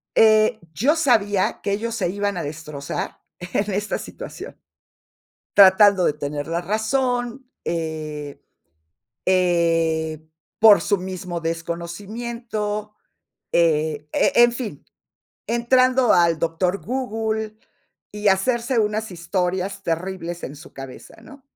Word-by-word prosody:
eh, 215 0 +5
yo 265 - +2
sabía 215 - +2
que 200 - -2
ellos 230 +3 -2
se 175 - -1
iban 200 0 -2
a - - -2
destrozar 150 -1 -6 0.2
en 195 +3 -2
esta 205 +2 -1
situación. - - -9 0.9
Tratando 195 -1 +7
de - - +2
tener 145 0 -4
la 170 +1 -1
razón. 245 +5 -1 0.2
Eh, 155 -3 -4 0.9
eh, 165 -3 +1 0.3
por 215 -2 +8
su 205 - +1
mismo 180 -2 -5
desconocimiento, 210 +6 -4 0.6
eh, 155 -2 +1
e - - +2
en 240 0 +7
fin, 230 - -6 0.6
entrando 255 +1 +3
al 170 -2 +4
doctor 175 +4 -1
Google 220 -3 -2 0.6
y 210 0 0
hacerse 235 +5 +1
unas 215 0 0
historias 180 +2 -2
terribles 175 0 -3
en 135 - -6
su 150 - -13
cabeza, 135 -1 -10
¿no? 280 -1 -14
190 Hz, 110 wpm, -22 LUFS, 165-220 Hz, 0.9 s, por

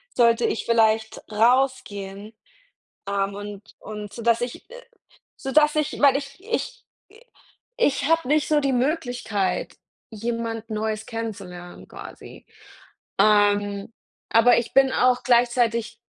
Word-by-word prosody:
sollte 235 -1 +4
ich - - -2
vielleicht 220 -1 +2
rausgehen, 215 -4 0 0.7
ähm, 200 0 -1
und 205 +1 -9
und 210 +1 -8
dass 230 0 +3
ich, 245 0 -6
äh - - -12 0.5
so 270 - -5
dass 300 +1 +4
ich 305 -1 -1
weil 280 -2 +6
ich 275 0 -8
ich 475 +2 -4 0.3
i 440 +3 -19 0.6
ich 285 - +1
habe 330 -3 +2
nicht 300 +2 +2
so 305 -1 +3
die 275 -2 0
Möglichkeit, 245 - -1 0.4
jemand 230 0 -4
Neues 215 0 -3
kennenzulernen, 195 -6 -7
quasi. - - -12 0.7
Ähm, 205 0 +2 0.4
aber 230 +2 +5
ich 235 - -2
bin 270 -1 +5
auch 250 0 +2
gleichzeitig 235 -1 +2
230 Hz, 125 wpm, -23 LUFS, 210-265 Hz, 0.7 s, weil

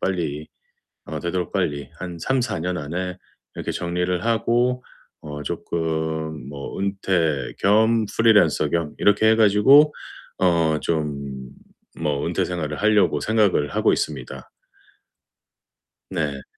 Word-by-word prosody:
빨리 80 -5 -2 0.6
어 - - -5
되도록 85 0 -2
빨리 70 -1 -2
한 90 -2 -6
3-4 125 -5 -1
년 90 +1 -2
안에 90 +5 -4 0.4
이렇게 - - -3
정리를 90 +1 -2
하고 120 +2 +1 0.4
어 75 0 -7
쪼끔 80 -2 -3
뭐 70 -1 -7
은퇴 95 -7 0
겸 110 +2 +3
프리랜서 105 -8 +3
겸 85 -3 -2
이렇게 105 +2 +4
해 110 - +4
가지고 115 +8 +6 0.5
어 85 -4 +2
좀 70 -4 -3 0.5
뭐 75 -3 -1
은퇴 - - 0
생활을 75 -4 -4
하려고 105 -1 +3
생각을 105 -9 +2
하고 - - +2
있습니다. - - -4 1.6
네. 75 -7 -3
85 Hz, 215 characters per minute, -22 LUFS, 75-105 Hz, 1.6 s, 가지고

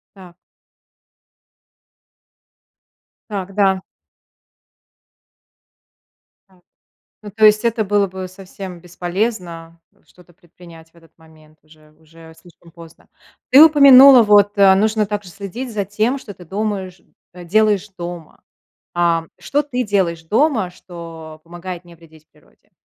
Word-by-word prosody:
Так. 180 -3 -15 2.9
Так, 195 -2 -6
да. 195 -2 +1 2.7
Так. 185 -1 -27 0.6
Ну, 210 -1 -10
то 215 +2 +2
есть 215 +2 +4
это 230 -1 0
было 205 0 0
бы 185 0 -8
совсем 185 -1 -11
бесполезно 175 -1 -5 0.3
что-то 180 -1 -23
предпринять 170 -1 -18
в - - -36
этот 165 -1 -24
момент, 155 -1 -22
уже 155 -1 -23
уже 160 +1 -18
слишком 170 0 -21
поздно. 165 -1 -17 0.4
Ты 265 +3 +7
упомянула, 275 -4 +8
вот, 205 -1 +3
э, 195 -1 +6
нужно 215 +2 0
также 205 -2 -6
следить 205 +6 -8
за 205 -1 -2
тем, 215 +7 -1
что 220 -6 -11
ты 180 - -16
думаешь 190 -1 -5 0.3
делаешь 205 +3 0
дома. 175 -2 -9 0.5
Ам, 170 -1 0
что 290 - -1
ты 255 -4 -3
делаешь 185 -6 -1
дома, 220 - 0
что 165 -3 -12
помогает 175 +1 -9
не 170 -1 -16
вредить 160 -2 -21
природе, - - -30
185 Hz, 120 wpm, -18 LUFS, 170-210 Hz, 2.9 s, упомянула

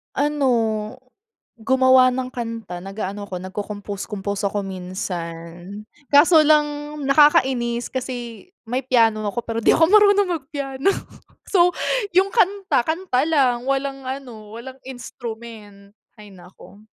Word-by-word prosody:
Ano, 245 -6 0 0.6
gumawa 260 +1 +5
ng 255 0 -4
kanta 230 -7 -5
nag-aano 200 +1 -6
ako 185 - -5
nagkocompose 200 +2 -6
compose 200 -1 -4
ako 200 0 -3
minsan, 180 0 -7 0.3
kaso 310 +3 +6
lang 300 0 +4 0.4
nakakainis 260 -4 +3
kasi 245 - -6 0.2
may 250 +3 -1
piano 230 -4 +2
ako 235 +3 -4
pero 230 0 -3
di - - +5
ako 325 - +5
marunong 405 +1 +5
mag 265 - -29
piano. 280 +2 -1 0.6
So 360 -2 +4 0.5
yung 385 +2 +3
kanta, 395 - +2
kanta 320 -2 -1
lang 260 -5 +1
walang 275 0 -1
ano 255 -5 -8
walang 260 +4 -10
instrument, 225 -5 -10 0.2
hay 205 -2 -13
naku. 190 +3 -16
240 Hz, 120 wpm, -21 LUFS, 205-275 Hz, 0.6 s, kaso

